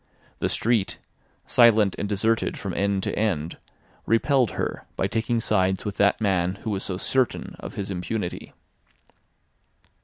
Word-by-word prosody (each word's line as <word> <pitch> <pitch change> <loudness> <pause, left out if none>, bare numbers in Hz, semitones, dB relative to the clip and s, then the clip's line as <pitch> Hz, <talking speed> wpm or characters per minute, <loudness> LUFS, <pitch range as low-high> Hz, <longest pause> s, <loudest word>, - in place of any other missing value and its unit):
The - - 0
street, 115 -4 +1 0.5
silent 110 -5 +5
and 100 - -2
deserted 110 +2 +1
from 100 -4 -4
end 100 +1 0
to - - -1
end, 85 -7 -1 0.5
repelled 125 +1 +3
her - - -3
by - - 0
taking 115 +1 0
sides 95 -4 +1
with 105 -2 -4
that 100 0 +3
man 95 -3 +1
who 110 - -2
was 95 -2 -2
so 95 - -2
certain 130 +5 0
of - - -8
his 100 0 -4
impunity. 90 +1 -4
105 Hz, 145 wpm, -25 LUFS, 95-115 Hz, 0.5 s, silent